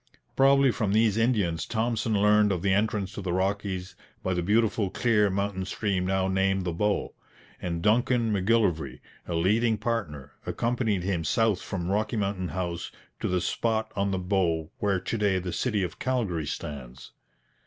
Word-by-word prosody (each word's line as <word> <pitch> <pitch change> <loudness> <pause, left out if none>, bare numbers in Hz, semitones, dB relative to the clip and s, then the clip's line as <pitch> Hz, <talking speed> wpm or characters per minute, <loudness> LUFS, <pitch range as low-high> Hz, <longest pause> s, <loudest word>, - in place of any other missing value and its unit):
Probably 135 0 +5
from 105 -4 -1
these 110 -1 +3
Indians 105 -9 +1
Thompson 115 -1 0
learned 105 0 +4
of 90 -3 -2
the 100 -1 +3
entrance 105 -1 0
to 105 - -5
the 90 -2 -3
Rockies 95 -1 -2 0.3
by 95 - 0
the 90 - 0
beautiful 105 +1 +2
clear 105 -1 +2
mountain 100 0 -1
stream 95 -1 -1
now 95 0 +1
named 95 0 +1
the 85 - -1
Bow; 105 +4 0 0.5
and 85 -2 -3
Duncan 115 +1 +2
M'Gillivray, 95 - +1 0.3
a 85 - -2
leading 110 +7 +2
partner, 95 - -3
accompanied 115 -6 -1
him 90 -3 -1
south 110 +4 +1
from 90 -2 -3
Rocky 110 +4 0
Mountain 100 -3 -1
House 85 -1 -4 0.3
to - - -1
the 90 -1 0
spot 110 +4 -1
on 100 0 0
the 95 - -1
Bow 90 -3 0
where 100 -2 +1
to 115 - -3
day 100 -2 +2
the 90 -1 -3
city 110 -6 0
of 90 - -5
Calgary 105 - -1
stands. 65 -5 -7
100 Hz, 165 wpm, -27 LUFS, 90-110 Hz, 0.5 s, Probably